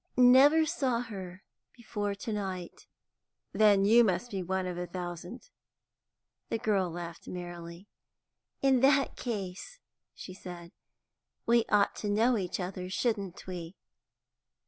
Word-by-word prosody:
"Never 270 Hz, +6 st, +7 dB
saw 255 Hz, -6 st, 0 dB
her 190 Hz, -5 st, -8 dB, 0.3 s
before 205 Hz, -3 st, -3 dB
to 215 Hz, +2 st, -5 dB
night." 190 Hz, -4 st, -5 dB, 0.7 s
"Then 205 Hz, -2 st, +5 dB
you 230 Hz, +3 st, +7 dB
must 195 Hz, +3 st, 0 dB
be 195 Hz, -2 st, -2 dB
one 190 Hz, +1 st, -2 dB
out 180 Hz, -, -2 dB
of 175 Hz, -, -7 dB
a 180 Hz, -, -4 dB
thousand." 175 Hz, -, -7 dB, 1.0 s
The -, -, 0 dB
girl 200 Hz, -5 st, +1 dB
laughed 170 Hz, 0 st, -8 dB
merrily. 175 Hz, +1 st, -8 dB, 0.8 s
"In 265 Hz, -2 st, +4 dB
that 275 Hz, +2 st, +3 dB
case," 205 Hz, -, -5 dB, 0.4 s
she 185 Hz, -, -9 dB
said, 175 Hz, -2 st, -10 dB, 0.7 s
"we 235 Hz, 0 st, +4 dB
ought 205 Hz, -1 st, +3 dB
to 210 Hz, -, -3 dB
know 225 Hz, +4 st, +3 dB
each 185 Hz, -4 st, -2 dB
other, 180 Hz, 0 st, -5 dB
shouldn't 200 Hz, -3 st, -2 dB
we?" 180 Hz, -1 st, -7 dB
195 Hz, 130 wpm, -30 LUFS, 180-235 Hz, 1.0 s, Never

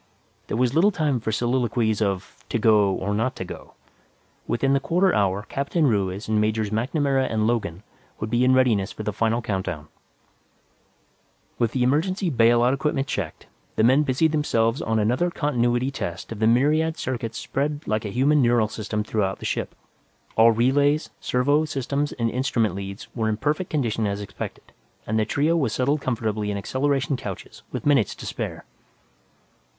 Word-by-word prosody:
There -, -, -2 dB
was 125 Hz, 0 st, +2 dB
little 170 Hz, +7 st, +5 dB
time 150 Hz, -9 st, 0 dB
for 110 Hz, -, -3 dB
soliloquies 120 Hz, -2 st, 0 dB
of 100 Hz, -3 st, -2 dB
to -, -, 0 dB
go, 105 Hz, -3 st, +4 dB
or 95 Hz, +2 st, -2 dB
not 120 Hz, +5 st, 0 dB
to 95 Hz, -, -5 dB
go; -, -, -10 dB, 0.7 s
within 135 Hz, +3 st, +1 dB
the 140 Hz, -, +3 dB
quarter 180 Hz, +6 st, +2 dB
hour, 100 Hz, 0 st, +1 dB
Captain 145 Hz, +4 st, 0 dB
Ruiz 100 Hz, -4 st, 0 dB
and 110 Hz, -1 st, +2 dB
Majors 110 Hz, -1 st, 0 dB
MacNamara 135 Hz, +3 st, 0 dB
and 110 Hz, -1 st, +1 dB
Logan 110 Hz, -6 st, -1 dB, 0.4 s
would 110 Hz, 0 st, -4 dB
be 120 Hz, +1 st, +2 dB
in 130 Hz, 0 st, +5 dB
readiness 110 Hz, -7 st, +2 dB
for 110 Hz, -, -7 dB
the 105 Hz, 0 st, -2 dB
final 115 Hz, +3 st, 0 dB
count 95 Hz, -4 st, -2 dB
down. 75 Hz, -1 st, -5 dB, 1.7 s
With 115 Hz, -1 st, +1 dB
the 125 Hz, -, +1 dB
emergency 170 Hz, +8 st, +1 dB
bail 120 Hz, -1 st, +4 dB
out 125 Hz, +2 st, +3 dB
equipment 135 Hz, 0 st, 0 dB
checked, 100 Hz, -, -4 dB, 0.3 s
the 110 Hz, -, +2 dB
men 130 Hz, +5 st, +5 dB
busied 150 Hz, +3 st, +2 dB
themselves 115 Hz, -6 st, +1 dB
on 110 Hz, 0 st, 0 dB
another 125 Hz, +11 st, +1 dB
continuity 125 Hz, -5 st, 0 dB
test 85 Hz, -9 st, -5 dB
of 110 Hz, -, -6 dB
the 110 Hz, -, +3 dB
myriad 155 Hz, +7 st, +2 dB
circuits 115 Hz, -3 st, -4 dB
spread 145 Hz, +2 st, -2 dB
like 110 Hz, 0 st, -1 dB
a 105 Hz, -, -4 dB
human 140 Hz, +7 st, +3 dB
neural 120 Hz, -3 st, +3 dB
system 105 Hz, -1 st, -3 dB
throughout 105 Hz, -3 st, -1 dB
the -, -, -9 dB
ship. -, -, -2 dB, 0.6 s
All 115 Hz, +1 st, +6 dB
relays, 140 Hz, +6 st, +2 dB
servo 145 Hz, +5 st, +2 dB
systems 145 Hz, 0 st, -2 dB
and 115 Hz, -2 st, -1 dB
instrument 120 Hz, -5 st, 0 dB
leads 100 Hz, 0 st, -7 dB
were 110 Hz, -2 st, 0 dB
in 105 Hz, -, -1 dB
perfect 150 Hz, -, -1 dB
condition 115 Hz, -7 st, 0 dB
as 100 Hz, 0 st, -2 dB
expected, 100 Hz, 0 st, -8 dB, 0.3 s
and 110 Hz, +1 st, 0 dB
the 110 Hz, -, +2 dB
trio 150 Hz, +8 st, +1 dB
was 135 Hz, -9 st, 0 dB
settled 140 Hz, +3 st, +1 dB
comfortably 110 Hz, -5 st, -2 dB
in 100 Hz, -, -2 dB
acceleration 135 Hz, +5 st, 0 dB
couches 100 Hz, -8 st, -8 dB
with -, -, -5 dB
minutes 140 Hz, -8 st, +3 dB
to -, -, -9 dB
spare. -, -, -5 dB
120 Hz, 175 wpm, -24 LUFS, 110-140 Hz, 1.7 s, All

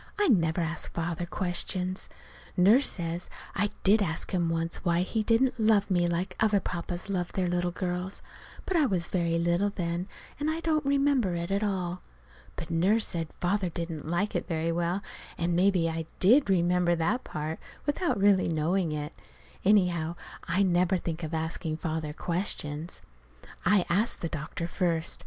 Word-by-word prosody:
I 410 Hz, -4 st, +3 dB
never 170 Hz, -6 st, +3 dB
ask 165 Hz, +1 st, -3 dB
Father 170 Hz, +1 st, -2 dB
questions. 185 Hz, +1 st, -1 dB, 0.5 s
Nurse 215 Hz, +10 st, +6 dB
says 170 Hz, -1 st, -4 dB, 0.2 s
I 205 Hz, +1 st, +1 dB
did 210 Hz, +3 st, +5 dB
ask 160 Hz, -5 st, -2 dB
him 175 Hz, -2 st, +1 dB
once 165 Hz, 0 st, -1 dB
why 170 Hz, -1 st, +2 dB
he 215 Hz, +4 st, -1 dB
didn't 230 Hz, +3 st, +2 dB
love 215 Hz, -2 st, +3 dB
me 175 Hz, -1 st, +3 dB
like 180 Hz, +2 st, -2 dB
other 210 Hz, -2 st, +3 dB
papas 175 Hz, 0 st, -4 dB
loved 180 Hz, -3 st, -2 dB
their 185 Hz, -2 st, +1 dB
little 175 Hz, 0 st, 0 dB
girls. 180 Hz, +1 st, -4 dB, 0.4 s
But 370 Hz, -, +1 dB
I 300 Hz, -4 st, +4 dB
was 180 Hz, -5 st, -1 dB
very 170 Hz, -2 st, +1 dB
little 170 Hz, +4 st, +2 dB
then, 175 Hz, -2 st, -3 dB, 0.3 s
and 295 Hz, +1 st, 0 dB
I 320 Hz, +1 st, -1 dB
don't 315 Hz, -2 st, +1 dB
remember 275 Hz, -9 st, +2 dB
it 170 Hz, +2 st, -3 dB
at 200 Hz, +1 st, +1 dB
all. 185 Hz, -4 st, -2 dB, 0.5 s
But 165 Hz, -, -6 dB
Nurse 195 Hz, +7 st, +3 dB
said 165 Hz, -2 st, -2 dB
Father 185 Hz, +1 st, +1 dB
didn't 165 Hz, -2 st, -5 dB
like 195 Hz, +5 st, 0 dB
it -, -, -2 dB
very 165 Hz, -1 st, 0 dB
well, 175 Hz, +4 st, -1 dB, 0.3 s
and 170 Hz, 0 st, 0 dB
maybe 180 Hz, -2 st, +3 dB
I 165 Hz, -1 st, -3 dB
did 240 Hz, +7 st, +5 dB
remember 175 Hz, -1 st, +3 dB
that 205 Hz, +10 st, 0 dB
part, 155 Hz, +1 st, -4 dB, 0.3 s
without 295 Hz, -, 0 dB
really 195 Hz, -1 st, +4 dB
knowing 165 Hz, +2 st, +1 dB
it. 150 Hz, +1 st, -4 dB, 0.5 s
Anyhow, 180 Hz, -5 st, +3 dB, 0.3 s
I 180 Hz, +4 st, +2 dB
never 180 Hz, 0 st, +3 dB
think 170 Hz, -1 st, -4 dB
of 160 Hz, -2 st, -4 dB
asking 160 Hz, 0 st, -2 dB
Father 160 Hz, -2 st, -3 dB
questions. 165 Hz, -1 st, -3 dB, 0.6 s
I 200 Hz, -2 st, +4 dB
asked 200 Hz, +7 st, +1 dB
the 165 Hz, -, -2 dB
doctor 155 Hz, +3 st, -4 dB
first. 170 Hz, -2 st, 0 dB
175 Hz, 165 wpm, -28 LUFS, 170-200 Hz, 0.6 s, Nurse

